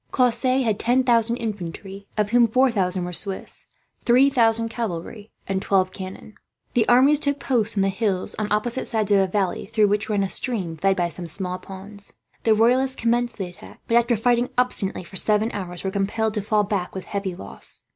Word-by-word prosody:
Cosse 255 +1 +2
had 220 -3 0
ten 250 +2 +2
thousand 235 -1 +3
infantry, 200 -2 -6
of 210 0 0
whom 240 -1 +5
four 255 +3 +3
thousand 185 -4 0
were 180 - -6
Swiss; 195 +2 -2 0.4
three 260 +4 +5
thousand 230 -2 +3
cavalry, 215 -1 -5
and 195 -1 -2
twelve 190 -2 +2
cannon. 190 +3 -9 0.4
The 230 -3 +2
armies 270 +4 +5
took 285 -1 -1
post 230 -5 0
on 195 - +3
the 195 - +2
hills 195 -2 -1
on 210 -1 -2
opposite 230 +4 -1
sides 215 -3 -1
of 200 - +5
a 190 - +2
valley, 190 -1 -1
through 215 -1 +2
which 210 +2 0
ran 205 -2 +1
a - - 0
stream 190 -11 -2
fed 195 +4 +1
by 175 -2 0
some 175 0 -2
small 180 +2 -3
ponds. 200 +1 -8 0.3
The 220 -1 +5
Royalists 255 +4 +3
commenced 240 +1 0
the 190 -4 -4
attack 175 - -15
but, - - -2
after 235 0 +3
fighting 240 +2 +2
obstinately 235 -7 0
for 190 +2 -6
seven 215 +4 +1
hours, 180 -3 -6
were 190 - -2
compelled 210 +3 -1
to 210 - -1
fall 210 +1 +1
back 195 -3 -3
with 190 - -6
heavy 200 -3 -4
loss. 100 - -8
210 Hz, 200 wpm, -23 LUFS, 195-235 Hz, 0.4 s, whom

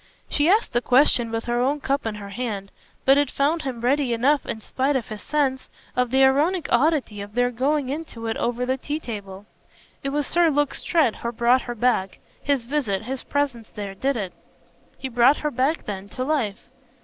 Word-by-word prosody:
She 295 +3 +2
asked 425 +4 +3
the 240 - +2
question 250 -2 +4
with 225 0 -2
her 240 0 0
own 280 +4 +1
cup 275 -3 -1
in 220 - -3
her 200 -1 -8
hand, 200 -3 -4 0.3
but 270 +1 +6
it 290 -2 +1
found 300 +5 +1
him 255 -5 -5
ready 260 0 +2
enough 275 +5 +2
in 230 - -3
spite 265 +6 -1
of 250 -4 -2
his 215 -1 -6
sense 275 -3 -1 0.3
of 250 -1 +1
the 265 +2 +4
ironic 300 +6 +3
oddity 260 -6 +2
of 205 +2 -9
their 245 0 +2
going 270 +3 0
into 280 -6 -5
it 225 - -1
over 245 +1 -1
the 260 +1 0
tea 295 +4 -3
table. 200 -6 -7 0.6
"It 275 - -1
was 290 +1 0
Sir 345 -1 +3
Luke 290 -1 +1
Strett 315 -10 +1
who 235 - -3
brought 240 +2 +3
her 240 - -6
back. 220 -5 +1 0.2
His 280 -4 0
visit, 235 -8 -1
his 260 +3 -4
presence 270 -6 -2
there 200 -2 -5
did 265 +6 -1
it." 190 -5 -4 0.6
"He 265 - -4
brought 250 +3 +4
her 300 - -2
back 270 +5 0
then 200 -1 -6
to 255 - 0
life." 255 -8 -1
255 Hz, 205 wpm, -24 LUFS, 230-285 Hz, 0.6 s, but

